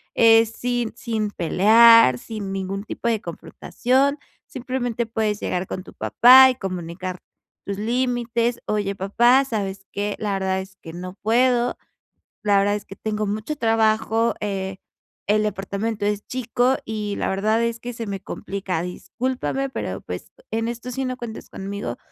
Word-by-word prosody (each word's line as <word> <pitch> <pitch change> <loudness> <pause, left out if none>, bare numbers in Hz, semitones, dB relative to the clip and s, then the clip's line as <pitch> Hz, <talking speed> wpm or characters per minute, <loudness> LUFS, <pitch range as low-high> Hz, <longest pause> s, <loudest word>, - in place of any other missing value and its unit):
es 225 -1 +6
sin 240 -1 -2
sin 220 -3 -2
pelear, 215 - +6
sin 205 - -6
ningún 195 +1 -3
tipo 225 - -5
de 225 -3 +1
confrontación, 260 - -1 0.3
simplemente 245 -3 -3
puedes 220 -2 -1
llegar 180 +1 -2
con 185 - -5
tu - - -14
papá 260 +2 +7
y 255 - -1
comunicar 185 -3 -5 0.5
tus 200 -1 -4
límites: 240 +1 0
"Oye, 205 -2 -1
papá, 240 +8 +4
¿sabes 195 -6 -4
qué?, 205 0 -2
la 210 -2 -1
verdad 190 -1 0
es 190 0 -12
que 165 - -9
no 180 +2 -7
puedo. 245 +2 +2 0.7
La 205 -1 +4
verdad 205 +1 +2
es 210 - -6
que 195 - -11
tengo 215 0 -2
mucho 215 +8 -3
trabajo, 225 -1 +2
eh, 195 -2 -3 0.5
el 210 +1 +3
departamento 205 +1 -2
es 205 0 -1
chico 255 +1 +1
y 210 -2 -3
la - - -1
verdad 215 +4 +1
es 235 0 -1
que 245 +1 -6
se 230 0 -5
me 200 -2 -4
complica. 190 -3 -4
Discúlpame, 255 +9 -3
pero, - - -4
pues, - - -7 0.2
en 225 0 -1
esto 235 +1 -5
sí 265 +2 -3
no 255 0 -3
cuentes 235 -3 -8
conmigo, 195 -11 -5
220 Hz, 155 wpm, -23 LUFS, 195-240 Hz, 0.7 s, papá